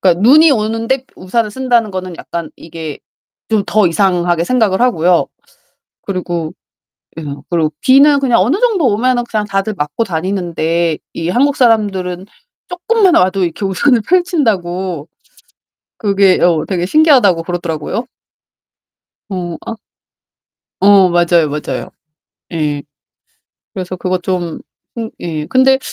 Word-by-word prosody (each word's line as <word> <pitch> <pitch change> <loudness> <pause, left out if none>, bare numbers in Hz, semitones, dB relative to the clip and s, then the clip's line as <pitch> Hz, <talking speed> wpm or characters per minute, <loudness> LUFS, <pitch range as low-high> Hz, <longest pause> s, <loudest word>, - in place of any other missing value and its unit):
그러니까 180 -2 +2
눈이 300 +8 +6
오는데 225 +3 -1
우산을 210 +4 -2
쓴다는 240 -2 0
거는 185 -2 -5
약간 170 -1 -6
이게 160 -2 -8 0.5
좀 215 -3 +1
더 215 -2 +3
이상하게 175 -2 +1
생각을 220 -4 +1
하고요. 180 -8 +2 0.8
그리고 175 -4 -4 0.7
예 - - -5 0.3
그러고 160 -3 0
비는 280 +2 +5
그냥 250 -7 +2
어느 250 - +1
정도 430 - +2
오면은 240 +3 +1
그냥 210 -1 -1
다들 200 +1 -2
맞고 150 +9 -2
다니는데 170 -3 -1 0.2
이 165 +1 -3
한국 275 +8 +2
사람들은 195 -6 +1 0.4
쪼끔만 370 +1 +2
와도 185 +1 +2
이렇게 170 +4 -4
우산을 225 +7 +2
펼친다고 190 - 0 0.9
그게 200 -2 +2
어 170 -3 +2
되게 180 -3 -1
신기하다고 255 - +4
그러더라고요. 175 +6 -4 1.3
어 175 -3 -4
아. 230 - -5 1.1
어 195 -2 +6
맞아요, 170 -2 +2
맞아요. 150 +1 -4 0.6
예. 150 -3 -2 0.9
그래서 185 -1 -5
그거 185 0 -1
좀 175 -2 -3 0.4
음 225 -1 -4
예 155 -3 -4
근데 265 +4 +3
190 Hz, 275 characters per minute, -15 LUFS, 175-235 Hz, 1.3 s, 눈이